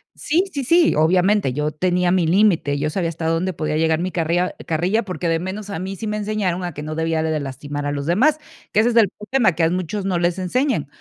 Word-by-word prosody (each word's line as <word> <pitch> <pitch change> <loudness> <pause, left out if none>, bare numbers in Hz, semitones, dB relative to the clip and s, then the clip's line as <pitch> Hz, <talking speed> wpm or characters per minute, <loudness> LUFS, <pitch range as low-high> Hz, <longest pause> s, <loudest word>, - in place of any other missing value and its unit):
Sí, 330 +5 +1
sí, 280 -2 -2
sí, 335 +5 +4
obviamente, 180 0 +2
yo 150 +3 -1
tenía 180 +2 +1
mi 180 -3 +2
límite, 170 -6 +3
yo 150 +2 -1
sabía 170 -1 -1
hasta 165 0 -5
dónde 165 +3 0
podía 155 -2 -2
llegar 160 0 +2
mi 185 +1 -2
carria 175 +2 0
carrilla, 175 +7 +1
porque 180 -4 -4
de 165 0 +1
menos 195 +4 -6
a 190 - -4
mí 190 +1 -5
sí 220 - -6
me 210 0 -2
enseñaron 205 -4 -2
a 175 - -3
que 150 - -6
no 155 +1 -5
debía 160 0 -1
de 160 -1 0
lastimar 145 +1 -5
a - - -1
los 140 -1 -3
demás, 260 - +3 0.3
que 215 - +4
ese 235 - +2
es 235 - -2
el 220 -5 +5
problema 210 -2 0
que 165 - 0
a 160 - +4
muchos 185 +2 -3
no 185 -3 0
les 175 +1 0
enseñan. 190 - 0
180 Hz, 245 wpm, -21 LUFS, 160-205 Hz, 0.3 s, el